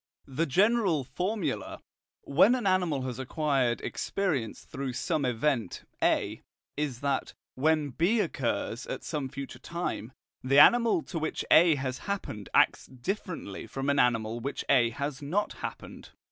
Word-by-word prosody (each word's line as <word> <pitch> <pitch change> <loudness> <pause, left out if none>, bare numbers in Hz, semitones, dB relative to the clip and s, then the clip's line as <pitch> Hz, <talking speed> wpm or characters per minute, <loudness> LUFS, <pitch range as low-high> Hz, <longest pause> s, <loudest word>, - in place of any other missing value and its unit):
The 145 +5 -1
general 195 - +3
formula, 155 - -3 0.4
when 185 - +5
an 245 - -3
animal 180 -8 +1
has 130 -1 -4
acquired 130 -3 0
experience 150 - -2
through 135 -1 -5
some 145 +3 -1
event 120 -4 -1 0.2
A, - - +1 0.3
is 145 -5 -3
that, 140 -2 -1 0.2
when 150 +1 +1
B 180 - +2
occurs 340 - -2
at - - -5
some 145 -4 -3
future 135 -2 -7
time, 170 -7 -4 0.3
the 135 +2 +2
animal 240 - +6
to 165 - -5
which 155 - -3
A 165 -1 +7
has 130 -2 -3
happened 110 - -4
acts - - +3
differently 150 - -5
from 135 +1 -1
an 140 - +1
animal 115 -2 +1
which 140 +4 -4
A 120 -4 +5
has 140 +4 -4
not 180 +9 -1
happened. - - -7
140 Hz, 145 wpm, -29 LUFS, 130-175 Hz, 0.4 s, A